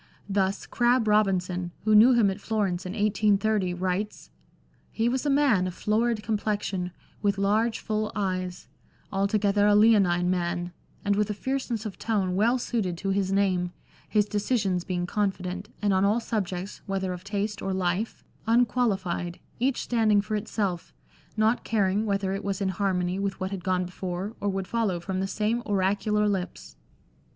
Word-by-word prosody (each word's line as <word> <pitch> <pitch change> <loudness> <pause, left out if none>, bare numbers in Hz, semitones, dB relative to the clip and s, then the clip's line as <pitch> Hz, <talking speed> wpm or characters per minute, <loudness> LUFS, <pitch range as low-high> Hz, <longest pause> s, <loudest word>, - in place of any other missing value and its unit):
Thus, 195 -1 0
Crabbe 240 -1 +2
Robinson, 185 -4 +1
who 215 +1 +3
knew 225 +5 +8
him 220 -5 +4
at 195 +2 -7
Florence 195 -5 -1
in 180 - -5
1830, 210 -2 +1
writes 185 +3 -3 0.2
— - - -36
" - - -36
He 225 - +3
was 260 +4 0
a - - +3
man 275 -10 +3
of 180 - -6
florid 220 +1 0
complexion, 205 -4 -2 0.3
with 200 -1 +1
large, 215 +4 +2
full 215 -1 -2
eyes; 185 -3 -2 0.4
altogether 205 +1 +2
a 205 - +5
'leonine' 195 -5 +4
man, 175 -1 -1 0.3
and 200 0 +2
with 210 0 +1
a 210 - -2
fierceness 245 -1 -2
of 210 - -6
tone 195 -5 0
well 230 +6 +3
suited 215 -8 -2
to 195 +3 -3
his 195 -1 0
name; 185 -3 +1 0.4
his 210 -2 +3
decisions 205 -3 0
being 180 -1 -2
confident, 190 -1 -2
and 205 -1 +3
on 190 0 +3
all 210 +4 +3
subjects, 195 -5 -3
whether 190 -1 -1
of 180 0 -8
taste 205 +1 -3
or 195 - -2
life, 185 +3 -1 0.2
unqualified, 205 -7 +1 0.2
each 260 +2 +1
standing 220 -3 +3
for 205 +2 -3
LANDOR. 210 0 -1
XV - - -13
itself, 190 -6 -2 0.4
not 220 +2 +2
caring 205 0 +1
whether 195 -1 0
it 195 +1 -4
was 200 -1 -2
in 195 -2 0
harmony 185 -1 0
with 195 -1 -2
what 190 0 -3
had 190 -3 -5
gone 185 -1 +1
before, 185 +3 -5
or 205 - 0
would 195 -1 -2
follow 210 -5 0
from 185 +2 -3
the 190 - -1
same 215 +4 0
oracular 205 +1 +1
lips." 190 -3 -3
200 Hz, 175 wpm, -27 LUFS, 185-215 Hz, 0.4 s, knew